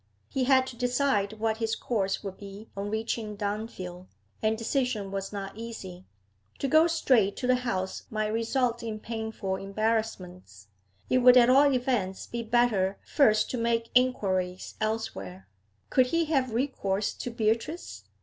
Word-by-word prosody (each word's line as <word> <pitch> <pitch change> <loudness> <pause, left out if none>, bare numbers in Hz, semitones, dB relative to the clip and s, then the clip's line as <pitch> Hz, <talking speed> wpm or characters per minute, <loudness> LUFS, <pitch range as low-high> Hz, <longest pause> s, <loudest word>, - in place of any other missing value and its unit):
He 260 -1 0
had 260 0 +5
to 260 - -8
decide 245 -4 +1
what 220 0 -1
his 225 0 -1
course 200 -5 -1
would 195 -2 -5
be 200 +2 -10
on 200 +1 -3
reaching 220 0 -3
Dunfield, 200 -4 -5 0.3
and 220 0 +1
decision 230 -4 -1
was 195 0 -4
not 195 -1 -6
easy. 195 -5 -8 0.5
To 275 - -1
go 315 +4 +5
straight 250 - +2
to 255 - -3
the 255 0 +4
house 190 -7 -3
might 215 -1 -1
result 235 +2 0
in 220 -2 -4
painful 220 -4 -4
embarrassments; 195 - -3 0.4
it 255 - +3
would 250 0 +8
at 245 0 +7
all 280 +2 +6
events 245 -7 -1
be 235 - -4
better 225 -5 +2
first 215 -7 +3
to 250 - -2
make 230 0 0
inquiries 190 -8 +1
elsewhere. 95 - -3 0.4
Could 255 -1 +4
he 335 +5 +1
have 270 -5 +1
recourse 215 -5 -1
to - - -5
Beatrice? 230 +8 -2
220 Hz, 150 wpm, -28 LUFS, 195-250 Hz, 0.5 s, would